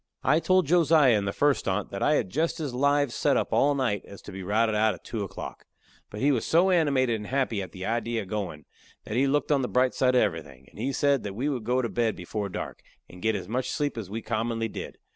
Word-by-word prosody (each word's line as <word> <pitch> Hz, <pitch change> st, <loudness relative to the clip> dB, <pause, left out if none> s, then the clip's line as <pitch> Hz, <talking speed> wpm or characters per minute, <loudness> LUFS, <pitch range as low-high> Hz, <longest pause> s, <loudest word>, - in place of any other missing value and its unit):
I -, -, +4 dB
told 185 Hz, +1 st, +3 dB
Josiah 155 Hz, -5 st, +5 dB
in 100 Hz, -1 st, 0 dB
the 100 Hz, -, -1 dB
first 145 Hz, 0 st, +1 dB
on't, 95 Hz, +1 st, -1 dB
that 100 Hz, -, -5 dB
I 150 Hz, -, +3 dB
had 100 Hz, -10 st, -1 dB
just 165 Hz, +4 st, 0 dB
as 145 Hz, -5 st, -3 dB
lives 145 Hz, 0 st, +2 dB
set -, -, +2 dB
up -, -, -1 dB
all 145 Hz, 0 st, +3 dB
night 120 Hz, -7 st, 0 dB
as 100 Hz, -, -12 dB
to -, -, -9 dB
be 95 Hz, 0 st, -7 dB
routed 110 Hz, +4 st, +1 dB
out 105 Hz, -1 st, +2 dB
at 85 Hz, -, -18 dB
two 115 Hz, -, -4 dB
o'clock. 95 Hz, -, -8 dB, 0.4 s
But 105 Hz, -, -7 dB
he 145 Hz, -, +4 dB
was 125 Hz, -5 st, 0 dB
so 180 Hz, +4 st, +3 dB
animated 135 Hz, -9 st, +2 dB
and 105 Hz, -1 st, -8 dB
happy 130 Hz, -6 st, 0 dB
at 95 Hz, -3 st, -7 dB
the 95 Hz, 0 st, -7 dB
idee 115 Hz, 0 st, -1 dB
of 105 Hz, -4 st, -3 dB
goin' 90 Hz, -8 st, -4 dB, 0.4 s
that -, -, -7 dB
he 135 Hz, +3 st, +3 dB
looked 145 Hz, +2 st, +1 dB
on 140 Hz, -2 st, +3 dB
the 125 Hz, -, -1 dB
bright 125 Hz, 0 st, +2 dB
side 130 Hz, -1 st, +2 dB
of 125 Hz, -, +5 dB
everything, 80 Hz, -9 st, -4 dB
and -, -, -15 dB
he 135 Hz, -, -1 dB
said 140 Hz, 0 st, +2 dB
that 100 Hz, -2 st, -6 dB
we 135 Hz, +7 st, -1 dB
would 125 Hz, -6 st, -3 dB
go 125 Hz, +2 st, +1 dB
to -, -, 0 dB
bed 115 Hz, -2 st, 0 dB
before 100 Hz, +3 st, -4 dB
dark, -, -, -6 dB, 0.3 s
and 90 Hz, -, -13 dB
get 110 Hz, +2 st, +1 dB
as 95 Hz, -3 st, -5 dB
much 125 Hz, +4 st, -2 dB
sleep 145 Hz, -1 st, -1 dB
as 110 Hz, -5 st, -6 dB
we 110 Hz, +2 st, -5 dB
commonly 115 Hz, 0 st, -1 dB
did. -, -, -7 dB
120 Hz, 260 wpm, -27 LUFS, 105-140 Hz, 0.4 s, Josiah